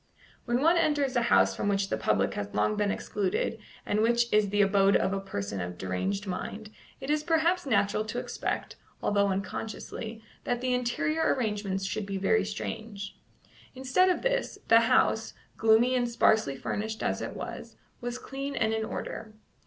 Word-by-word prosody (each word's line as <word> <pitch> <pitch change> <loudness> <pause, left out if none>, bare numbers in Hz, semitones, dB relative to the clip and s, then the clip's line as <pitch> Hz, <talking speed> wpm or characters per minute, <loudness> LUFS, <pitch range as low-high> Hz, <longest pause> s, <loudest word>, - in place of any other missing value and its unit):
When 240 +1 +1
one 335 +3 +5
enters 290 -5 +1
a 240 - +3
house - - +4
from - - -2
which 195 -1 +1
the - - +1
public 100 0 +1
has 100 0 -5
long 105 - +2
been 205 -1 +1
excluded 205 +2 -1 0.3
and 210 +1 +1
which 235 +1 +2
is 210 -1 +4
the 205 +1 +3
abode 195 0 +4
of 195 - +2
a 195 - -1
person 100 - -4
of 90 0 -5
deranged 95 - -2
mind, 205 +3 -5 0.3
it 270 - -3
is 300 0 +2
perhaps 330 +1 +2
natural 210 -3 +2
to - - -5
expect, - - -3 0.3
although 200 -1 +3
unconsciously, 220 +3 -4 0.2
that 245 -1 -1
the 255 0 0
interior 305 +6 +1
arrangements 205 -6 -2
should 200 +2 -3
be 195 -1 -3
very 140 - +2
strange. 200 - -5 0.6
Instead 265 +9 +3
of 365 - 0
this, - - 0
the 230 - +8
house, 225 -1 +2 0.2
gloomy 225 +3 +4
and 245 -1 +1
sparsely 220 -10 +3
furnished 220 - -3
as - - -1
it - - -5
was, - - -7 0.2
was 245 0 -3
clean 275 +2 -5
and 220 0 +1
in 220 0 -1
order. 220 0 -6
220 Hz, 175 wpm, -29 LUFS, 195-250 Hz, 0.6 s, the